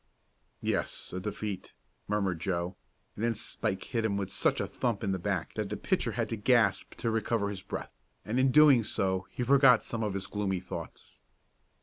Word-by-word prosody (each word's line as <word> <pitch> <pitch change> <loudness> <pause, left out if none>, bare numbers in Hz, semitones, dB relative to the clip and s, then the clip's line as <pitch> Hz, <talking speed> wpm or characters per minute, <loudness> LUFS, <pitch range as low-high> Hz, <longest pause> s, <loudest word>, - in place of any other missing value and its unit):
"Yes, - - -2
a 90 - -2
defeat," 100 -1 -5 0.3
murmured 100 -5 0
Joe, 85 +1 -2 0.4
and 105 - -5
then 115 -1 +1
Spike 105 -2 -3
hit 115 -2 -2
him 100 -3 0
such 95 +1 +1
a - - 0
thump 110 +2 -2
in 100 - 0
the 95 - -1
back - - -2
that - - -3
the - - -3
pitcher - - 0
had - - -1
to - - -1
gasp 110 -2 +2
to 115 - -1
recover 110 -1 0
his 100 -2 -5
breath, - - -6 0.3
and 115 +4 0
in 130 +1 +4
doing 140 -3 +7
so 95 -2 0
he 125 - -3
forgot 135 -2 +6
some 115 - -3
of 105 -3 -1
his 100 0 -2
gloomy 100 -3 -1
thoughts. 90 - -9
105 Hz, 190 wpm, -30 LUFS, 95-115 Hz, 0.4 s, doing